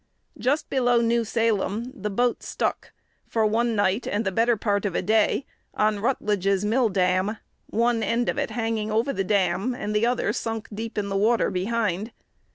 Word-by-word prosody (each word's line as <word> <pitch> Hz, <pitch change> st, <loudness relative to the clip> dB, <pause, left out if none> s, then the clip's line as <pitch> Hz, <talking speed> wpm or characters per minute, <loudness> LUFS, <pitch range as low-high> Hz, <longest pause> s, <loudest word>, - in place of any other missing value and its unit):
Just 285 Hz, +5 st, 0 dB
below 245 Hz, -2 st, +2 dB
New 235 Hz, 0 st, +2 dB
Salem 225 Hz, +1 st, 0 dB
the 210 Hz, -6 st, -4 dB
boat 240 Hz, +4 st, 0 dB
"stuck," -, -, -3 dB, 0.4 s
for 225 Hz, -1 st, +1 dB
one 230 Hz, +2 st, +1 dB
night 205 Hz, +2 st, +1 dB
and 210 Hz, +2 st, -1 dB
the 190 Hz, -, 0 dB
better 230 Hz, +4 st, +2 dB
part 205 Hz, -1 st, 0 dB
of 200 Hz, -4 st, -2 dB
a -, -, +1 dB
day 220 Hz, +6 st, +2 dB, 0.3 s
on 215 Hz, -1 st, +1 dB
Rutledge's 200 Hz, -4 st, 0 dB
mill 230 Hz, +2 st, +2 dB
dam, 185 Hz, +2 st, +1 dB, 0.3 s
one 235 Hz, 0 st, +1 dB
end 230 Hz, +3 st, 0 dB
of -, -, 0 dB
it -, -, -1 dB
hanging 225 Hz, -1 st, -2 dB
over 230 Hz, +6 st, +1 dB
the 195 Hz, -, -1 dB
dam, 195 Hz, +4 st, +1 dB
and 210 Hz, -3 st, -4 dB
the 220 Hz, +3 st, +3 dB
other 245 Hz, 0 st, 0 dB
sunk 225 Hz, -1 st, -3 dB
deep 225 Hz, +2 st, -6 dB
in 200 Hz, -1 st, -1 dB
the 195 Hz, -, -2 dB
water 220 Hz, +2 st, +2 dB
behind. 205 Hz, +1 st, -1 dB
220 Hz, 180 wpm, -25 LUFS, 205-235 Hz, 0.4 s, the